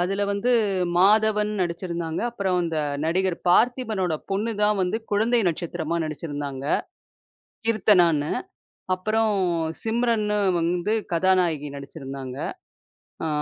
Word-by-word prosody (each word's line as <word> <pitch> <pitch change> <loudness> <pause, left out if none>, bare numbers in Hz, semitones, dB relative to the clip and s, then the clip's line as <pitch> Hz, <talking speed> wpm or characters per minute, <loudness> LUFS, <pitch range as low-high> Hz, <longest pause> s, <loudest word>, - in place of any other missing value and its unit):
அதுல 195 +3 0
வந்து 200 +5 0 0.5
மாதவன் 210 +2 +4
நடிச்சிருந்தாங்க. 170 -2 -3
அப்புறம் 195 -5 -1
அந்த 165 -2 -2 0.3
நடிகர் 180 +2 +1
பார்த்திபனோட 220 -4 +2 0.2
பொண்ணு 210 +4 0
தான் 210 -1 +3
வந்து 180 +4 0
குழந்தை 225 +4 +3
நட்சத்திரமா 170 -1 -3
நடிச்சு 155 +1 -6
இருந்தாங்க, 140 -2 -5 1.0
"கீர்த்தனான்னு". 175 -9 +3 0.6
அப்புறம் 215 +4 0 0.5
சிம்ரன்னு 225 -2 +1 0.2
வந்து 175 +5 0 0.2
கதாநாயகி 170 -5 +2
நடிச்சு 140 +2 -9
இருந்தாங்க. 135 -1 -6 0.9
ஆ - - 0
185 Hz, 105 wpm, -24 LUFS, 165-215 Hz, 1.0 s, மாதவன்